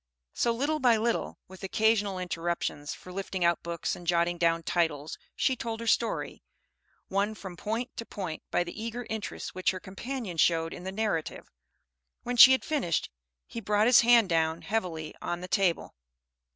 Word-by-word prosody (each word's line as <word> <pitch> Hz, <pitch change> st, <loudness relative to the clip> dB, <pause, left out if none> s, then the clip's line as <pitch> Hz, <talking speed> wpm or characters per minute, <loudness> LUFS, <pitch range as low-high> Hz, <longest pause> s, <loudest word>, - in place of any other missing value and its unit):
So, 235 Hz, -, +1 dB
little 285 Hz, +6 st, 0 dB
by 245 Hz, -4 st, +4 dB
little, 230 Hz, +2 st, -1 dB
with 190 Hz, +1 st, -13 dB
occasional 205 Hz, 0 st, +1 dB
interruptions 170 Hz, -4 st, -3 dB
for 180 Hz, -, -12 dB
lifting 190 Hz, -2 st, -2 dB
out 170 Hz, 0 st, +2 dB
books 170 Hz, 0 st, -3 dB
and 175 Hz, -, -12 dB
jotting 170 Hz, 0 st, +1 dB
down 165 Hz, -1 st, +2 dB
titles, 160 Hz, -4 st, -1 dB, 0.2 s
she 260 Hz, -, +1 dB
told 230 Hz, -2 st, -4 dB
her 230 Hz, -, -5 dB
story, 230 Hz, 0 st, 0 dB, 0.7 s
won 200 Hz, +3 st, 0 dB
from 190 Hz, -4 st, -8 dB
point 225 Hz, +7 st, -4 dB
to 230 Hz, -, -5 dB
point 180 Hz, -6 st, -5 dB
by -, -, +1 dB
the 175 Hz, +5 st, -7 dB
eager 230 Hz, +1 st, -4 dB
interest 220 Hz, -2 st, -5 dB
which 185 Hz, -, 0 dB
her 185 Hz, -, -2 dB
companion 200 Hz, 0 st, -6 dB
showed 165 Hz, 0 st, +2 dB
in 180 Hz, -, -9 dB
the 190 Hz, -, -3 dB
narrative. 195 Hz, -6 st, -3 dB, 0.7 s
When 245 Hz, -, -2 dB
she 250 Hz, +2 st, +10 dB
had 260 Hz, -, +2 dB
finished, 270 Hz, -, -1 dB, 0.3 s
he 230 Hz, -, -7 dB
brought 210 Hz, +1 st, +2 dB
his 245 Hz, +1 st, +7 dB
hand 235 Hz, -2 st, +6 dB
down 160 Hz, -1 st, +1 dB
heavily 175 Hz, -8 st, -3 dB
on 175 Hz, 0 st, -3 dB
the 180 Hz, -, -6 dB
table. 185 Hz, -3 st, +1 dB
190 Hz, 175 wpm, -29 LUFS, 170-230 Hz, 0.7 s, she